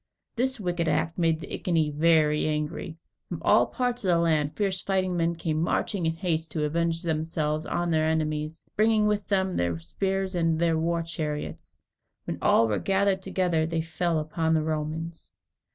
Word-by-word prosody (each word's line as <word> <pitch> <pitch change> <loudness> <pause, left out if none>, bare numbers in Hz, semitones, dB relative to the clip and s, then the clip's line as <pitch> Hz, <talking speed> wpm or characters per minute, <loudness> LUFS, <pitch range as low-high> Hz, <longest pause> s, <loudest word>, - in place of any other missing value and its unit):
This 260 +1 0
wicked 175 -3 -1
act 160 +2 0
made 165 -2 +2
the - - -8
Iceni 160 -4 0
very 150 0 +3
angry. 155 +1 -3 0.3
From - - -4
all - - +5
parts 245 -2 -2
of - - -1
the 175 -2 +4
land, 155 -3 +1
fierce 195 -3 0
fighting 185 -2 0
men 170 0 +1
came 160 -2 -1
marching 175 +1 0
in 160 - +1
haste 165 -3 -2
to 155 - -1
avenge 165 +2 0
themselves 155 -1 -1
on 175 0 -1
their 155 -1 +2
enemies, 155 0 -2
bringing 215 0 +3
with 210 -1 0
them 190 -2 +1
their 85 -1 0
spears 190 - -2
and 165 -2 +1
their 165 0 +2
war 170 +1 0
chariots. 155 -3 -5 0.5
When - - -5
all 115 - +4
were 105 -2 0
gathered 195 0 +1
together, 175 -4 0
they 165 0 -1
fell 165 +1 -1
upon 160 +1 0
the 155 - +1
Romans. 160 +1 -4
165 Hz, 175 wpm, -27 LUFS, 155-180 Hz, 0.5 s, all